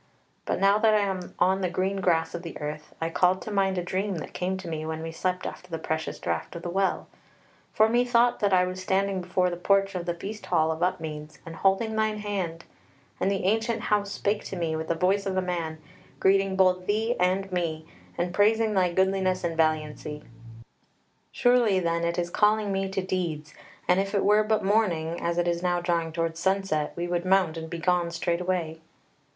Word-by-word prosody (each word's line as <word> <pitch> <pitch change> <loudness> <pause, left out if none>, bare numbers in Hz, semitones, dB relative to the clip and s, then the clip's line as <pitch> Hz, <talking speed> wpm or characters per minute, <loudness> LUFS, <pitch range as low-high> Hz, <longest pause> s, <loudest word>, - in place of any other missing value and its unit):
But - - -1
now 200 +2 +4
that 220 -1 +4
I 210 - +4
am 190 -3 -3
on 190 +2 +2
the 185 - 0
green 190 +3 -1
grass 165 -3 +1
of 175 - -4
the 170 -2 -7
earth 150 0 -6
I 165 0 -2
called 180 +2 +3
to 215 - -6
mind 195 -2 +1
a 180 - -1
dream 190 +2 -2
that 155 - -7
came 185 +1 -2
to 190 -2 -8
me 160 -2 -3
when 160 0 -4
we 165 - -4
slept 180 +2 -2
after 180 - -7
the 165 - -3
precious 160 0 -3
draught - - -3
of 170 - -7
the 175 - -3
Well: 195 +1 0 0.6
for 215 - +4
methought 240 +1 +3
that 205 -1 +1
I 180 -1 +5
was 185 0 -5
standing 190 0 0
before 180 0 0
the 175 - -4
porch 195 +2 +2
of 180 -1 -4
the 175 - -1
Feast 210 +4 -7
hall 160 +1 +2
of 160 +1 -5
Upmeads 155 -3 -3
and 165 0 -8
holding 200 +5 +1
thine 215 -1 +1
hand, 190 -6 -3 0.6
and 190 - +1
the 195 -1 -1
ancient 225 +4 +1
House 205 -1 0
spake 205 +1 -1
to - - -5
me 165 -3 -1
with 160 0 -4
the 170 - 0
voice 195 +4 +1
of 190 -1 -1
a - - +4
man, 170 -3 -3 0.4
greeting 195 0 +3
both 185 -1 +3
thee 220 +3 +1
and 185 +2 +1
me, 165 -3 -2 0.3
and 175 +1 -1
praising 215 +2 +3
thy 185 -3 +2
goodliness 190 0 +1
and 170 -1 -1
valiancy. 155 -2 -1 1.1
Surely 245 -6 +3
then 170 -1 0
it 170 +1 -1
is 175 0 -1
calling 210 0 +2
me 195 0 -1
to 190 -1 -2
deeds, 165 -5 -3 0.3
and 180 +1 +4
if 195 +1 -1
it 200 - +2
were 210 +1 +5
but 215 0 +1
morning, 175 -6 +1
as 170 0 -1
it 175 0 +1
is 170 0 0
now 175 -1 +1
drawing 170 -2 -1
towards 165 0 -2
sunset, 190 -5 0
we 175 0 -3
would 175 0 -1
mount 185 -3 +2
and 160 0 -6
be 170 - -4
gone 175 0 +1
straightway." 170 -1 -2
185 Hz, 210 wpm, -27 LUFS, 170-195 Hz, 1.1 s, I